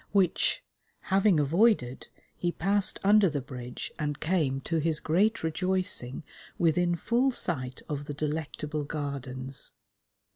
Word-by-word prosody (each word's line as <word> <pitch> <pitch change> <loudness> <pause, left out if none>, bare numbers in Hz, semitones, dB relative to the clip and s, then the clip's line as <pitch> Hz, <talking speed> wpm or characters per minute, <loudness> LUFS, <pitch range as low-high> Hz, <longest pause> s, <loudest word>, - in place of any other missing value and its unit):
Which, 190 -4 +2 0.5
having 195 -3 +4
avoided, 150 - +2 0.3
he 175 - -1
passed 195 +3 +1
under 205 -1 +5
the 145 -2 -2
bridge 125 -2 -7
and 145 -2 -2
came, 155 -6 0
to 165 +4 -1
his 155 0 +1
great 205 +7 +1
rejoicing, 175 -5 -1 0.3
within 175 +1 +2
full 240 +9 +1
sight 130 - -3
of 145 -1 -4
the 145 - -5
delectable 150 0 -3
Gardens. 135 -3 -2
160 Hz, 120 wpm, -28 LUFS, 140-185 Hz, 0.5 s, under